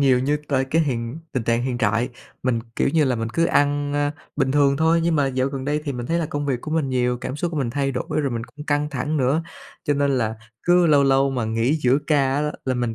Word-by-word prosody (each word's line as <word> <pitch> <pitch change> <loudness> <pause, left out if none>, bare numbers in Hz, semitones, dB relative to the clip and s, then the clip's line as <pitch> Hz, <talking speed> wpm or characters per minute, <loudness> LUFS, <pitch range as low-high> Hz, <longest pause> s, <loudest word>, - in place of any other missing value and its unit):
nhiều 130 -3 +4
như 145 +4 +1
tới 135 -2 +1
cái 160 +5 +1
hiện 120 0 -3
tình 130 -4 -1
trạng 115 +1 +1
hiện 125 -1 -2
trại, 115 +3 +1 0.3
mình, 125 -3 +1 0.2
kiểu - - +2
như 155 +1 +3
là, 125 -2 +1
mình 115 0 -2
cứ 165 - +2
ăn, 145 -2 +1
ơ, 145 0 +1 0.3
bình 135 0 +1
thường 140 -1 +3
thôi 160 +2 +3
nhưng 165 -2 +2
mà 140 -2 +2
dạo 130 0 0
gần 135 -1 -5
đây 150 +1 0
thì 140 - -2
mình 120 -1 -5
thấy 170 +1 0
là 160 - -1
công 145 0 -3
việc 125 -3 -1
của 155 - -7
mình 155 -4 0
nhiều, 125 -1 +1
cảm 130 - -5
xúc 170 +3 -2
của 160 - -5
mình 125 -4 -1
thay 135 +1 -1
đổi, 125 +4 -2
rồi 140 -3 -1
mình 115 -1 -3
cũng 150 +4 -12
căng 145 0 +1
thẳng 150 +3 -2
nữa. 140 +4 +2 0.4
Cho 145 - +1
nên 140 0 +1
là 110 -1 -1 0.3
cứ 175 0 +4
lâu 145 -3 +5
lâu 135 0 +3
mà 125 -3 -1
nghỉ 115 +6 +1
giữa 130 +3 +4
ca 135 -3 +2
á, 150 +1 0
là 130 -1 0
mình 120 -2 -1
140 Hz, 275 wpm, -22 LUFS, 125-150 Hz, 0.4 s, lâu